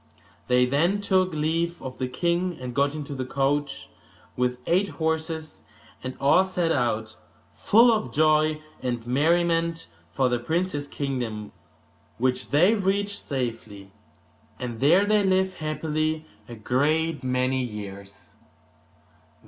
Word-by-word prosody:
They 125 0 +4
then 165 +10 +1
took 185 -2 +2
leave 165 +2 -1
of 130 -1 -8
the 130 - -1
king, 170 +6 -1
and 125 -1 -6
got 140 +3 +1
into 145 -2 -5
the 130 -1 -3
coach 140 +1 -1 0.5
with 125 0 0
eight 185 +4 +2
horses, 160 -1 -3 0.4
and 130 0 -5
all 140 +7 +5
set 180 -3 -1
out, 110 -5 -1 0.4
full 230 +3 +5
of 175 - -2
joy 155 +1 +2 0.2
and 120 -3 -3
merriment, 165 +4 +1 0.3
for 130 -2 +1
the 120 -1 0
prince's 155 +2 -2
kingdom, 120 -8 -4 0.7
which 130 +1 0
they 175 +9 +5
reached 200 0 -1
safely; 115 -7 -4 0.7
and 120 -3 -5
there 170 - +5
they 210 0 +3
lived 190 -1 +1
happily 155 0 -2 0.2
a 120 - -7
great 150 +8 0
many 130 +1 0
years. 100 -4 -8
145 Hz, 125 wpm, -25 LUFS, 125-170 Hz, 0.7 s, all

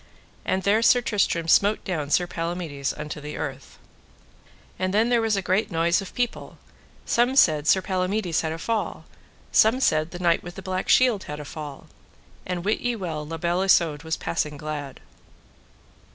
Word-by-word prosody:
And 190 0 0
there 210 +3 +3
Sir 245 +2 +5
Tristram 195 -8 0
smote 205 +5 +3
down 155 -7 -3
Sir 175 +4 +3
Palamides 165 -5 -3
unto 150 0 -7
the 150 +1 -7
earth. - - -6 1.0
And 185 +1 -1
then 225 +3 +3
there 240 -1 +3
was 225 -2 +1
a 195 - -2
great 190 +4 +1
noise 170 0 +1
of 195 - -10
people: 245 -1 -3 0.5
some 245 +3 +2
said 155 - +4
Sir 190 - +4
Palamides 185 -2 0
had 160 - -2
a 160 - -4
fall, 225 +6 -3 0.5
some 225 +4 +4
said 155 -10 +2
the 175 - -8
Knight 170 -2 +2
with 175 0 -9
the 190 - -9
Black 185 0 -3
Shield 245 -6 +4
had 150 0 -6
a 150 - -7
fall. 145 -1 -8 0.6
And 180 -1 -3
wit 210 - +1
you 245 -1 -1
well 165 -6 -4
La 165 +1 -5
Beale 175 +3 0
Isoud 170 -6 +3
was 160 0 -3
passing 150 -3 -2
glad. 145 -2 -6
175 Hz, 180 wpm, -24 LUFS, 155-205 Hz, 1.0 s, Sir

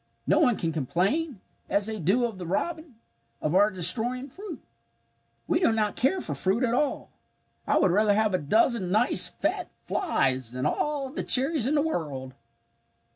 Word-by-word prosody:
No - - +2
one 240 -5 +3
can 165 - -2
complain 190 - -1 0.3
as 200 0 +1
they 220 0 -4
do 200 +9 +1
of 220 -5 -6
the 175 - -6
robin 315 - -3 0.4
of 155 - -2
our 205 +3 +4
destroying 230 +8 +3
fruit. 385 +3 -9 0.9
"We 330 - +1
do 335 - +3
not 215 -2 -1
care 320 +10 +1
for - - -4
fruit 195 +7 -1
at 235 -2 0
all. 275 +2 -2 0.6
I - - +2
would 185 - +3
rather 205 +2 +2
have 215 -1 +1
a 185 - +1
dozen 215 - +1
nice 215 +6 +3
fat - - -3
flies 130 - -1
than 130 0 -4
all 285 -3 -2
the - - -3
cherries 270 -1 +3
in 295 - +1
the 290 - +2
world!" 140 - -4
220 Hz, 175 wpm, -26 LUFS, 180-270 Hz, 0.9 s, our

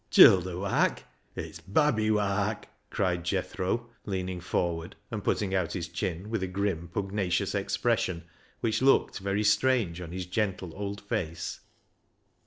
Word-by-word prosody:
" - - -42
Childer 90 -1 +7
wark? 100 +1 +1 0.3
It's - - -6
babby 110 -1 +2
wark," 105 0 0 0.2
cried 90 -3 0
Jethro, 95 +5 -2
leaning 95 -3 -3
forward, 85 -2 -2 0.2
and - - -3
putting 100 -2 0
out 90 -4 0
his 90 -2 -3
chin 90 +3 -4
with 115 -4 0
a 95 - -1
grim, 95 -3 -1
pugnacious 95 -2 -1
expression 85 -2 0 0.4
which 115 0 +1
looked 135 -5 +4
very 100 +2 0
strange 105 -5 +2
on 85 -2 -7
his 90 0 -4
gentle 95 -2 -2
old 100 +1 -4
face. 85 -5 -3
95 Hz, 140 wpm, -29 LUFS, 90-105 Hz, 0.4 s, Childer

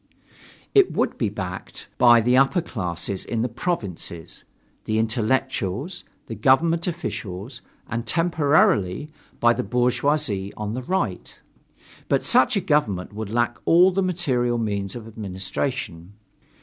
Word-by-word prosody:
It 395 -2 +5
would - - -1
be 115 - +1
backed 95 -3 -6
by 120 -2 +7
the 125 +3 +3
upper 135 +7 +4
classes 90 - -4
in 115 -1 -2
the - - +1
provinces, 100 - -4 0.4
the 110 - 0
intellectuals, 125 - -1 0.2
the - - -6
government 160 - +2
officials, 120 - -5 0.3
and 115 +1 -3
temporarily 150 - +2 0.3
by 120 0 +5
the 120 - -2
bourgeoisie 125 -4 0
on 105 0 -3
the 125 - -3
Right. 185 +8 -3 0.7
But - - +2
such 250 0 +4
a - - +1
government 105 - 0
would 105 -1 -5
lack 120 +1 0
all 180 +3 +6
the 195 +1 0
material 130 -10 0
means 100 -3 -2
of 115 -2 -8
administration. 100 -2 -4
120 Hz, 130 wpm, -23 LUFS, 100-150 Hz, 0.7 s, by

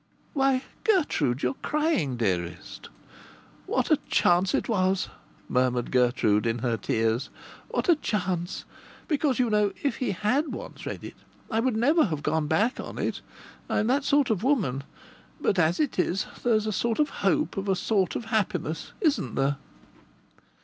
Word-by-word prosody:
"Why, 270 -2 +2 0.2
Gertrude, 165 - +1
you're 125 +1 +1
crying, 300 - 0
dearest!" 90 -6 -3 0.8
"What - - 0
a - - +6
chance 180 +2 +3
it - - -1
was!" 190 -3 +1 0.4
murmured 125 -1 +1
Gertrude, 120 -4 +2
in 115 +1 0
her 120 -2 +1
tears. 115 +3 0 0.4
"What - - -2
a 345 - +6
chance! 185 - -2 0.4
Because, 290 -4 +1
you 245 -3 +1
know, 210 -1 +2
if 280 - 0
he 255 - -1
had 250 - 0
once - - -8
read - - -5
it - - -7 0.4
I 225 - +1
would 240 -1 +1
never 300 +8 +4
have 155 -7 -3
gone 155 0 0
back 210 - +1
on - - -6
it. - - -2 0.5
I'm 210 - +1
that 270 +5 +2
sort 280 -3 +3
of 210 - 0
woman. 185 - +1 0.5
But 195 - +1
as 165 +2 +2
it 290 -10 0
is, 180 +2 +1 0.2
there's 220 -3 +2
a 215 - 0
sort 230 +3 0
of 300 -1 +2
hope 305 -4 +1
of 195 0 -3
a 190 - +3
sort 195 -1 0
of 235 - -3
happiness, 185 -7 -1
isn't 300 -4 +1
there?" 140 +1 +1
195 Hz, 165 wpm, -27 LUFS, -, 0.8 s, a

